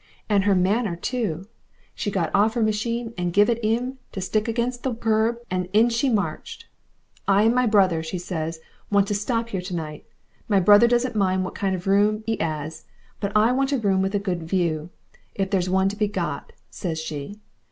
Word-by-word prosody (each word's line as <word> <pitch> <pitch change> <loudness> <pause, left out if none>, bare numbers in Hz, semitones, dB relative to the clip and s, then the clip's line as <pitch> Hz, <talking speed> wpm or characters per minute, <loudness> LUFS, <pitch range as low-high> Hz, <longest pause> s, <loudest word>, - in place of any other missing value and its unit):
"And 200 -2 +2
her 200 -1 +4
manner 195 +1 +1
too! 190 -4 -3 0.5
She - - -3
got 190 -4 -1
off 215 +2 +3
her 235 - +2
machine 230 +2 -1
and 175 -1 -1
give 205 +5 +4
it 235 0 -2
'im 245 +4 -1
to - - -4
stick 210 +3 0
up - - -6
against 240 +2 -1
the 255 -2 -2
kerb, 225 +1 +1
and 180 -1 -1
in 225 +3 +5
she 235 +4 +1
marched. 195 -9 -2 0.6
'I 200 +1 +4
and 225 +1 +4
my 250 0 +2
brother,' 190 -6 +3
says 165 -1 -4
she, 160 - -17 0.3
'want 200 -1 +3
to - - +1
stop 230 +3 -1
here 190 -4 -3
to 180 0 -5
night. 155 -2 -6 0.4
My 200 -3 +3
brother 205 +5 +7
doesn't 240 0 +1
mind 185 -2 +1
what - - -6
kind 195 -2 -1
of 180 - -7
room 205 +2 +2
'e 225 - 0
'as, 155 0 -4 0.3
but 200 -1 -2
I 220 +3 +4
want 270 +2 +1
a - - +2
room 195 -5 +1
with 195 +2 -1
a - - +2
good 185 -4 -2
view, 165 -2 -1 0.5
if 195 -1 -2
there's 185 -2 +1
one 190 +1 +3
to 200 - -5
be 210 0 +1
got,' 175 -8 -4 0.2
says 165 -4 -4
she. 160 +5 -6
200 Hz, 210 wpm, -24 LUFS, 180-225 Hz, 0.6 s, brother